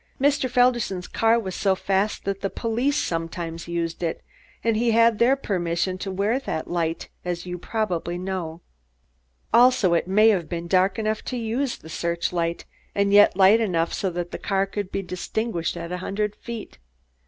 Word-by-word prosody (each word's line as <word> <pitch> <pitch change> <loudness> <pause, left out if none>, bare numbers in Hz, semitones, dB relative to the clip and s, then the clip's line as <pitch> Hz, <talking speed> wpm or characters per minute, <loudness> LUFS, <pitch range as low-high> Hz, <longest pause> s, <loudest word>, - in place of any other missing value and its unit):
Mr. 275 -1 +2
Felderson's 240 -7 +2
car 225 +1 +3
was 190 -5 -5
so 195 0 +1
fast 195 +2 -1
that 195 0 -2
the 195 - -1
police 245 +8 0
sometimes 165 - -3
used 170 -1 -3
it, 165 -2 -2 0.4
and 230 -1 +2
he 235 +2 +2
had 230 -1 +4
their 250 +3 +5
permission 185 -6 -1
to 195 - -4
wear 200 +6 0
that 160 -12 -4
light, 165 -1 -2 0.2
as 175 0 -3
you 180 0 -4
probably 175 -5 -2
know. 180 -3 -4 0.9
Also, 240 -7 +5
it 170 - +1
may 210 +4 +5
have 180 -7 +1
been 170 0 -4
dark 185 +2 +3
enough 215 -1 -1
to 255 - -4
use 240 +3 -1
the - - -14
search 170 +2 -2
light 170 -1 -1 0.3
and 200 0 +2
yet 205 -2 +6
light 200 +4 +6
enough 170 -6 0
so 195 - -1
that 175 0 -5
a - - -4
car 195 -1 +1
could 195 0 -5
be 195 - -2
distinguished 180 0 -3
at 170 - -6
a 180 - -2
hundred 210 +2 -2
feet. 230 - -8
195 Hz, 180 wpm, -24 LUFS, 175-225 Hz, 0.9 s, yet